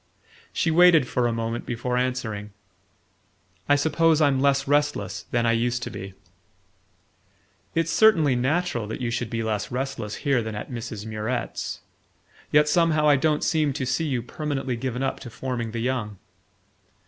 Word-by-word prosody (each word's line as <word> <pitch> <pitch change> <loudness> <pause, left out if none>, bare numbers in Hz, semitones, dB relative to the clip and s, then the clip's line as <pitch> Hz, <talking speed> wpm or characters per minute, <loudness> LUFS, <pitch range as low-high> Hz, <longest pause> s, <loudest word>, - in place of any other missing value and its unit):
She 165 - 0
waited 165 -4 +6
for 120 0 +1
a - - 0
moment 115 0 -3
before 120 +1 -3
answering: 125 -5 -2 1.2
"I 145 - +6
suppose 160 +2 +3
I'm 140 -4 +3
less 140 0 +2
restless 145 -9 0
than 120 -1 +1
I 115 - +3
used 120 +1 0
to - - -5
be." 95 -2 -8 1.6
"It's 165 0 +1
certainly 165 - +5
natural 130 -2 0
that 110 - -5
you 120 -2 -2
should 120 -1 -2
be 115 0 -2
less 105 -2 -2
restless 125 -4 -4
here 135 -4 +3
than 110 -1 -5
at 105 - -6
Mrs. 115 -3 -6
Murrett's; 110 +3 -4 0.7
yet 150 0 +5
somehow 155 -1 +3
I 145 - +6
don't 150 +2 +1
seem 155 -3 +1
to 130 - -3
see 160 +5 0
you 125 -5 -1
permanently 135 -1 -3
given 125 +1 -3
up 135 - -2
to 120 - -9
forming 120 -1 -4
the 115 +1 -4
young." 120 -5 -2
125 Hz, 160 wpm, -25 LUFS, 115-150 Hz, 1.6 s, waited